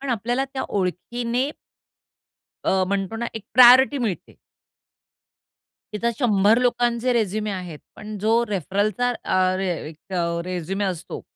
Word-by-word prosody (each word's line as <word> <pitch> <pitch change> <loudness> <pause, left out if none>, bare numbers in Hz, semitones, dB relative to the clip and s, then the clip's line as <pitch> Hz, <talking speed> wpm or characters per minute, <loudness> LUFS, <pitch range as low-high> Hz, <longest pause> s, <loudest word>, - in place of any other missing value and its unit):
पण 275 - -6
आपल्याला 240 +3 -1
त्या 265 - -2
ओळखीने 235 +7 -2 1.2
अ, 190 0 +2
म्हणतो 195 +2 -2
ना 235 +1 -3
एक 220 - -6
प्रायोरिटी 255 +3 +7
मिळते. 225 -8 -4 1.6
तिथे 235 +3 0
100 215 -3 +4
लोकांचे 245 0 +1
रेझ्युमे 215 -2 -1
आहेत, 180 -5 -6 0.2
पण 210 0 -8
जो 225 +3 +2
रेफरलचा 205 +5 0
अ, 185 0 +1
रे 190 0 -1
अ, - - -1
एक 160 +4 -12 0.3
रेझ्युमे 185 +2 -3
असतो. 180 -4 -5
215 Hz, 125 wpm, -23 LUFS, 190-240 Hz, 1.6 s, प्रायोरिटी